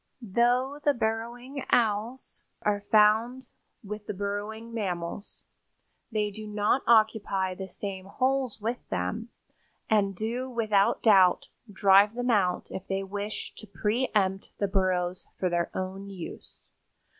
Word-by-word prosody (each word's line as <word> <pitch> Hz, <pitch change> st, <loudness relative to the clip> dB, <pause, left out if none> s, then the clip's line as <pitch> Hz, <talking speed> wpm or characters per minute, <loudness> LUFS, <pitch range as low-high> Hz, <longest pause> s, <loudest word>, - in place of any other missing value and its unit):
Though 250 Hz, +5 st, +2 dB
the 290 Hz, -1 st, +3 dB
Burrowing 235 Hz, +4 st, -3 dB
Owls 225 Hz, +2 st, 0 dB, 0.2 s
are 205 Hz, -1 st, +1 dB
found 220 Hz, +4 st, +4 dB, 0.4 s
with 210 Hz, 0 st, -7 dB
the 210 Hz, -, -4 dB
burrowing 205 Hz, +3 st, -4 dB
mammals, 185 Hz, -3 st, -4 dB, 0.7 s
they 210 Hz, -2 st, 0 dB
do 215 Hz, +1 st, -8 dB
not 210 Hz, +5 st, +1 dB
occupy 215 Hz, -4 st, +3 dB
the 190 Hz, +1 st, -7 dB
same 190 Hz, -2 st, -6 dB
holes 260 Hz, +1 st, 0 dB
with 230 Hz, +3 st, -2 dB
them 90 Hz, -, -2 dB, 0.6 s
and 200 Hz, -2 st, +3 dB
do 235 Hz, +6 st, -3 dB
without 215 Hz, -5 st, +2 dB
doubt 195 Hz, -5 st, +5 dB, 0.2 s
drive 200 Hz, +2 st, +5 dB
them 245 Hz, 0 st, 0 dB
out 185 Hz, -5 st, +2 dB
if 190 Hz, -, -6 dB
they 195 Hz, 0 st, -1 dB
wish 205 Hz, +2 st, -5 dB
to 215 Hz, -, -11 dB
pre 215 Hz, +6 st, -1 dB
empt 195 Hz, -1 st, 0 dB
the 200 Hz, -, 0 dB
burrows 185 Hz, -2 st, 0 dB
for 185 Hz, -, +1 dB
their 170 Hz, 0 st, 0 dB
own 190 Hz, +1 st, -4 dB
use. 185 Hz, -4 st, -10 dB
210 Hz, 135 wpm, -28 LUFS, 195-230 Hz, 0.7 s, doubt